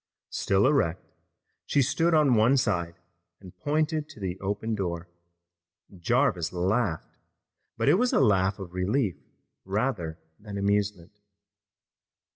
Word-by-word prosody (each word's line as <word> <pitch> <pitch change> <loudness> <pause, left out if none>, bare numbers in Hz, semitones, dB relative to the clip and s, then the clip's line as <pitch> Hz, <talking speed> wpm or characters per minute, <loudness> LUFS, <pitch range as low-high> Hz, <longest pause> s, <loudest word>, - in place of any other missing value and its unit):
Still 100 +1 +1
erect, 110 - +1 0.6
she 140 - +3
stood 165 +6 +2
on 150 -4 +4
one 115 +5 +4
side 85 -9 0 0.4
and 95 -2 -13
pointed 155 +1 -1
to 150 - -13
the 95 -2 -4
open 105 +3 -2
door. 90 -4 -3 0.9
Jarvis 90 - +1
laughed, 90 0 -1 0.6
but - - -1
it 185 - +5
was 250 0 +2
a - - +3
laugh 95 -6 +3
of 95 -4 -9
relief 95 +3 0 0.5
rather 95 -5 -2 0.2
than 105 -1 -7
amusement. 100 -2 -1
100 Hz, 120 wpm, -27 LUFS, 90-130 Hz, 0.9 s, it